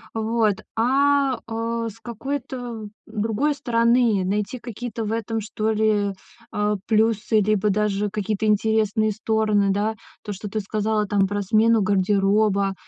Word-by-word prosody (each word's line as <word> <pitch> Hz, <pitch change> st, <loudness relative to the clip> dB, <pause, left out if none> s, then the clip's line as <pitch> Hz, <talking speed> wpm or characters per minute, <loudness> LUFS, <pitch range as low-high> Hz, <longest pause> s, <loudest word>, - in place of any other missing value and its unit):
вот, 220 Hz, -2 st, +1 dB, 0.2 s
а, 275 Hz, +3 st, +3 dB
э, 230 Hz, 0 st, -2 dB
с 225 Hz, +1 st, -14 dB
какой-то 240 Hz, -1 st, -5 dB, 0.2 s
другой 225 Hz, +7 st, -1 dB
стороны, 235 Hz, -5 st, +2 dB
найти 205 Hz, +5 st, -1 dB
какие-то 235 Hz, -1 st, -6 dB
в 210 Hz, -, -3 dB
этом, 225 Hz, 0 st, -2 dB
что 215 Hz, +1 st, -2 dB
ли, 210 Hz, -2 st, +1 dB, 0.4 s
э, 210 Hz, 0 st, 0 dB
плюсы, 220 Hz, 0 st, +2 dB
либо 210 Hz, 0 st, +1 dB
даже 210 Hz, 0 st, 0 dB
какие-то 210 Hz, +1 st, -2 dB
интересные 215 Hz, 0 st, +2 dB
стороны, 215 Hz, -1 st, +1 dB
да, 210 Hz, +3 st, 0 dB, 0.3 s
то, 210 Hz, -, -4 dB
что 200 Hz, +1 st, -7 dB
ты 215 Hz, +1 st, -2 dB
сказала, 210 Hz, +1 st, -1 dB
там, 195 Hz, -1 st, +2 dB
про 205 Hz, +1 st, -2 dB
смену 225 Hz, +2 st, +3 dB
гардероба. 200 Hz, +1 st, +2 dB
215 Hz, 135 wpm, -23 LUFS, 205-230 Hz, 0.4 s, а